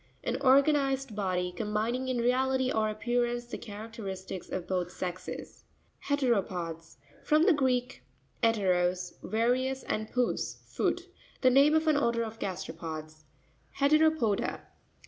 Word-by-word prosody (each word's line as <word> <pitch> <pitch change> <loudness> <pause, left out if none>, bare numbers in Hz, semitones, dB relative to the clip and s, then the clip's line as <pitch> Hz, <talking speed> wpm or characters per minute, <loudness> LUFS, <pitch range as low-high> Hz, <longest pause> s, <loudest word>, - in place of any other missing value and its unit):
An - - -2
organized 275 -2 +3
body, 180 -3 -1
com 190 - -3
bining 240 +5 0
in 255 - 0
reality 260 +2 +2
or 215 -1 +1
appearance 240 +2 -1
the 240 - -6
characteristics 205 -3 -7
of 180 -2 -3
both 180 -2 -1
sexes. 180 0 -6 0.4
He'reropops.—From 180 - 0
the 385 - +6
Greek 255 -3 0 0.4
ete. 225 0 +4
ros, 180 0 0
various, 255 +4 0
and 215 0 -3
pous, 250 -1 -1
foot. - - -1 0.4
The 255 - +5
name 280 +4 +6
of 315 0 +2
an 310 -2 +4
order 235 -4 +1
of 225 0 -7
gasteropods. 155 -4 -6 0.5
He'reropo'pa. 300 -6 +2
230 Hz, 125 wpm, -30 LUFS, 185-260 Hz, 0.5 s, the